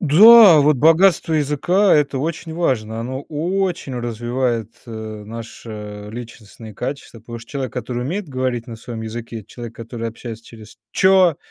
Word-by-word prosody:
Да, 195 +2 +8
вот 150 0 +3
богатство 165 +3 +4
языка- 155 +7 +2
это 145 -2 +1
очень 160 +3 -4
важно, 115 -10 -1
оно 130 +4 -5
очень 170 -2 -2
развивает, 120 -1 -2
э, - - -10 0.3
наши 105 -2 -9
личностные 115 -2 -10
качества, 125 -2 -6
потому 115 +1 -9
что 115 - -15
человек, 135 -4 -4
который 125 0 -4
умеет 175 +7 -4
говорить 130 -3 -2
на 115 - -8
своем 115 0 -8
языке, 115 +1 -6
и 105 - -18
человек, 120 -1 -10
который 115 0 -6
общается 115 0 -9
через 110 -2 -14
"чё", 190 -4 +4
125 Hz, 150 wpm, -20 LUFS, 115-155 Hz, 0.3 s, Да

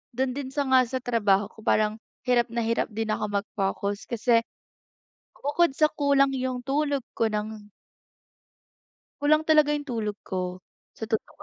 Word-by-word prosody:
do'n 260 0 0
din 280 -2 -4
sa 290 - +1
nga 260 -1 +6 0.2
trabaho 205 -4 +2
ko, - - -18
parang 215 -1 +2 0.3
hirap 240 -1 +3
na 235 - 0
hirap 230 0 +1
din 220 0 -2
ako 215 - -1 0.2
mag-focus 200 0 -3
kasi 235 0 +3 0.9
bukod 295 +4 +1
sa 305 - +5
kulang 280 -1 +3
'yung 255 -1 -2
tulog 285 -1 0
ko 225 -1 +2
ng 210 0 -5 1.5
Kulang 305 +2 +3
talaga 305 -2 +5
'yong 295 -1 -1
tulog 215 -5 -3
ko. 185 -1 -3 0.4
Sa 220 - -4
totoo 220 -1 -3
235 Hz, 145 wpm, -26 LUFS, 215-280 Hz, 1.5 s, nga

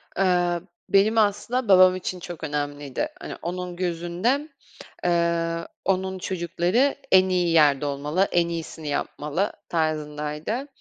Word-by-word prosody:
Iıı, 175 -2 +1 0.2
benim 210 +3 +4
aslında 220 +4 +1
babam 185 -1 +7
için 185 0 -4
çok 175 -2 -8
önemliydi. 145 -2 -3
Hani, - - -6
onun 180 +1 -4
gözünde, 180 - -1 0.6
ııı, 170 -1 0 0.2
onun 190 0 0
çocukları 185 - 0 0.2
en 190 0 +6
iyi 180 -2 +1
yerde 145 -3 +4
olmalı, 150 +7 0
en 170 -1 +3
iyisini 165 -2 -5
yapmalı 150 +5 -2 0.2
tarzındaydı. 155 - -2
175 Hz, 115 wpm, -24 LUFS, 155-190 Hz, 0.6 s, babam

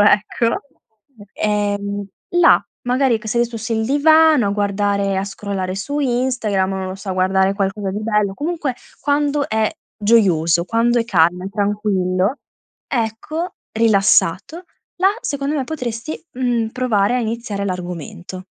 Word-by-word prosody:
ecco, 210 +3 +2 0.7
ehm, 205 -1 -1 0.3
là 345 - +6 0.2
magari 250 -2 +2
che 220 - -12
sei 235 +2 +2
su 230 - -8
s 225 +2 -6
il 220 0 +1
divano 310 -2 +5
a - - 0
guardare 200 -1 0
a 190 - 0
scrollare 195 -2 -4
su 285 +10 -3
Instagram, 240 -7 0
non 190 -1 -3
lo 185 - -5
so, 195 0 -10
a - - 0
guardare 190 +1 +2
qualcosa 195 0 -2
di 205 +2 -4
bello, 210 -3 +1
comunque 300 - -2 0.3
quando 290 0 +1
è 220 0 +1 0.3
gioioso, 175 -7 +3
quando 235 +4 +2
è - - -1
calmo, 180 -4 +2
è 195 - -3
tranquillo 200 +1 0 0.5
ecco, 255 +8 -3 0.2
rilassato, 215 - +2 0.3
là 375 +2 +4
secondo 285 +1 -2
me 270 - -1
potresti, 250 -1 -5
mhmm, 245 -3 0
provare 240 -4 +1
a 250 - +1
iniziare 220 -3 -3
l'argomento. 180 0 -6
215 Hz, 140 wpm, -19 LUFS, 195-250 Hz, 0.7 s, là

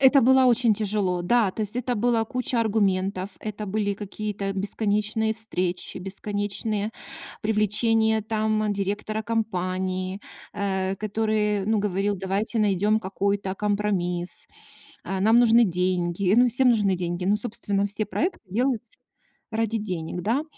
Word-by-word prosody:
Это 270 +1 +6
было 260 +2 +5
очень 240 -3 +4
тяжело. 200 -4 -1
Да, 220 +2 +3
то 220 - -7
есть 210 +2 0
это 250 -1 -1
была 230 0 +2
куча 250 0 -1
аргументов, 195 -3 0
это 210 -1 -5
были 205 0 -1
какие-то 205 -1 -4
бесконечные 210 +2 0
встречи, 185 -5 -3
бесконечные 205 +2 -2 0.5
привлечения 220 +1 +2
там 215 -1 0
директора 205 +2 -2
компании, 185 -3 -2 0.3
э-э, 190 -2 -1
который, 210 -1 0
ну, 220 -1 +2
говорил: 200 0 0
"Давайте 195 +4 -1
найдем 210 +2 +2
какой-то 200 -1 -1
компромисс, 195 -4 0 0.6
а, 190 -1 -2
нам 220 +4 +5
нужны 235 0 +6
деньги". 180 0 0
Ну, 245 +1 +6
всем 255 +2 +3
нужны 205 -5 +3
деньги, 175 0 -3
ну, 205 +2 +3
собственно, 205 -3 -2
все 205 +1 0
проекты 355 +3 -2
делаются 250 - -1 0.5
ради 225 0 0
денег, 180 -4 -4
да. 240 - 0
210 Hz, 130 wpm, -25 LUFS, 190-220 Hz, 0.6 s, Это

